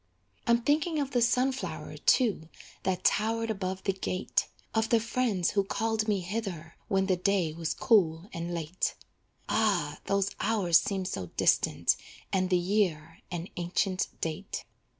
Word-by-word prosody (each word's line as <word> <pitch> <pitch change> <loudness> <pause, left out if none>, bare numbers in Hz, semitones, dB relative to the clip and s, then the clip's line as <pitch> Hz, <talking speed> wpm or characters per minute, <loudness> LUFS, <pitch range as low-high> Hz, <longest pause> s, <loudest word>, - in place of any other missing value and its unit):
I'm 235 0 +4
thinking 305 +4 +2
of 280 -2 -1
the 245 - +2
sunflower, 255 +3 0
too, 205 - +2 0.3
That 185 -1 -1
towered 225 +1 +2
above 190 -2 -3
the 195 - +1
gate; 185 -1 -1 0.3
Of 225 0 +1
the 230 - +5
friends 225 -5 0
who 200 - +2
called 220 +2 -1
me 205 -3 +1
hither 180 -4 -4
When 190 -1 +2
the 190 -1 +2
day 180 -4 +1
was 165 -1 -3
cool 175 -5 +3
and 170 +1 -4
late. 170 +1 -2 0.5
Ah! 180 -10 +1
those 200 0 +1
hours 195 -6 +4
seem 195 -2 -2
so 95 - -3
distant - - +3 0.4
And 185 -1 +2
the 180 - +4
year, 175 -4 0
an 175 0 -5
ancient 185 +2 0
date. 165 +4 -3
195 Hz, 150 wpm, -29 LUFS, 175-225 Hz, 0.5 s, the